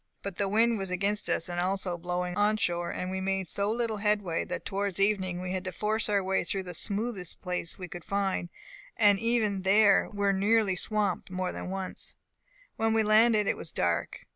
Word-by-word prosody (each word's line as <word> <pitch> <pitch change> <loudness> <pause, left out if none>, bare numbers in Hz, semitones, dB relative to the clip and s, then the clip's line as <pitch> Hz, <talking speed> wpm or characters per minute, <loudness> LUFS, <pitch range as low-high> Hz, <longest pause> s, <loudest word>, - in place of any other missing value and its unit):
But 200 -3 -5
the 200 -1 0
wind 225 +2 +3
was 195 -1 -4
against 195 +3 -1
us, 165 - 0
and 175 0 -3
also 185 0 -1
blowing 180 +1 -3
on 210 +2 +2
shore; 175 -3 -1
and 185 0 -4
we 190 0 -3
made 190 -1 -1
so 200 +5 0
little 230 -1 -1
headway, 205 -5 0
that - - -5
towards 200 -1 -1
evening 190 -3 +1
we 180 0 -4
had 185 -1 -2
to 185 - -3
force 215 +3 -1
our 200 -2 +2
way 190 +1 0
through 190 +2 -2
the 180 -1 -7
smoothest 200 0 -1
place 180 -2 -1
we 180 - -7
could 175 -1 -9
find, 195 -2 -1 0.5
and 205 -3 +5
even 225 -4 +1
then 200 +2 +4
were 200 -1 +1
nearly 205 0 +2
swamped 205 -1 -1
more 185 0 -2
than - - -6
once. 190 0 -5 0.6
When 225 0 +1
we 220 - +3
landed 215 0 +4
it - - +1
was - - -7
dark. - - -1
195 Hz, 200 wpm, -29 LUFS, 185-210 Hz, 0.6 s, and